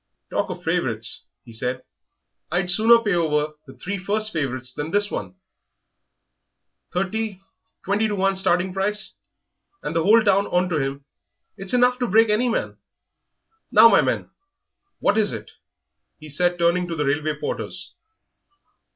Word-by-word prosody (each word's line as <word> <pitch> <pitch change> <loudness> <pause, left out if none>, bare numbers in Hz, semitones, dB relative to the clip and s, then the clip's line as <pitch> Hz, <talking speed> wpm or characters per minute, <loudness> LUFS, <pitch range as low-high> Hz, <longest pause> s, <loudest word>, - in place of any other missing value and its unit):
"Talk - - -1
of - - -7
favourites!" - - -2 0.2
he 115 - -13
said; 125 +3 -3 0.7
"I'd 180 +1 +1
sooner 225 +4 +6
pay 205 -3 +1
over 155 -3 0
the 135 - -12
three 195 +8 -4
first 215 +3 -1
favourites 130 -5 -2
than 150 +1 -4
this 205 +3 +1
one - - -5 1.6
thirty, 195 +2 -2 0.5
twenty 205 +3 +1
to 210 - -2
one 195 0 +1
starting 185 -1 +1
price, 205 +2 0 0.7
and - - -4
the 165 - +2
whole 220 +6 +5
town 200 -1 +3
onto 180 -3 0
him; 135 0 -4 0.5
it's 195 +3 -2
enough 250 0 +3
to 245 - 0
break 220 +2 +4
any 240 +4 +2
man.... 235 - -2 0.9
Now, - - +8
my - - +5
men, - - -2 0.7
what 205 - +2
is 210 - +2
it?" - - -7 0.7
he 155 0 -12
said, 175 +4 +1
turning 175 +1 +2
to 170 - -4
the 150 -1 -1
railway 150 +2 -1
porters. - - -5
185 Hz, 150 wpm, -23 LUFS, 155-210 Hz, 1.6 s, Now